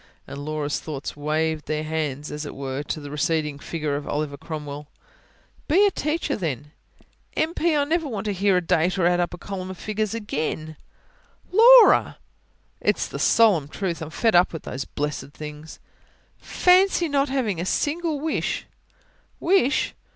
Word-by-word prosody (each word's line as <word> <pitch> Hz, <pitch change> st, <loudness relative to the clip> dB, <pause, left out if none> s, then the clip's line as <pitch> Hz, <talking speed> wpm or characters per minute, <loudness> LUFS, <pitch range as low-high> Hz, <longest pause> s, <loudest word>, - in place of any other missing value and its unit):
And 140 Hz, -, -8 dB
Laura's 150 Hz, -1 st, -2 dB
thoughts 145 Hz, -3 st, -6 dB
waved 155 Hz, +1 st, -1 dB
their 155 Hz, 0 st, -1 dB
hands, 150 Hz, -2 st, -3 dB
as 150 Hz, +1 st, -5 dB
it 145 Hz, -, -7 dB
were, 135 Hz, 0 st, -4 dB
to 150 Hz, -, -4 dB
the 145 Hz, -1 st, -9 dB
receding 150 Hz, -1 st, -1 dB
figure 150 Hz, -2 st, -3 dB
of 145 Hz, 0 st, -5 dB
Oliver 145 Hz, -1 st, -2 dB
Cromwell. 150 Hz, -1 st, -7 dB, 0.8 s
"Be 375 Hz, +7 st, +5 dB
a 405 Hz, -, +3 dB
teacher, 300 Hz, -2 st, -1 dB
then." 150 Hz, -, -4 dB, 0.7 s
"M.P.! 325 Hz, 0 st, +1 dB
I 290 Hz, -, +3 dB
never 320 Hz, +2 st, 0 dB
want 215 Hz, -6 st, -4 dB
to 205 Hz, -, -1 dB
hear 195 Hz, 0 st, +2 dB
a -, -, +2 dB
date 175 Hz, +4 st, +2 dB
or 180 Hz, -, +2 dB
add 175 Hz, 0 st, +3 dB
up 175 Hz, -, 0 dB
a 180 Hz, -, -8 dB
column 185 Hz, 0 st, -6 dB
of 190 Hz, -, -7 dB
figures 215 Hz, +1 st, -2 dB
again." 155 Hz, -6 st, -3 dB, 0.8 s
"Laura!" 470 Hz, +4 st, +7 dB, 0.6 s
"It's -, -, 0 dB
the -, -, -7 dB
solemn 205 Hz, -11 st, +4 dB
truth. 170 Hz, +1 st, -4 dB
I'm 160 Hz, -, -5 dB
fed 225 Hz, +7 st, +1 dB
up 175 Hz, 0 st, +4 dB
with 160 Hz, -, -7 dB
all -, -, -5 dB
those 130 Hz, +1 st, -4 dB
blessed 145 Hz, -1 st, -4 dB
things." 150 Hz, +1 st, -9 dB, 0.6 s
"Fancy 365 Hz, -1 st, +3 dB
not 280 Hz, -1 st, +1 dB
having 225 Hz, -10 st, -1 dB
a -, -, -1 dB
single 310 Hz, -, -1 dB
wish!" 315 Hz, +2 st, -2 dB
165 Hz, 165 wpm, -24 LUFS, 150-235 Hz, 0.8 s, Laura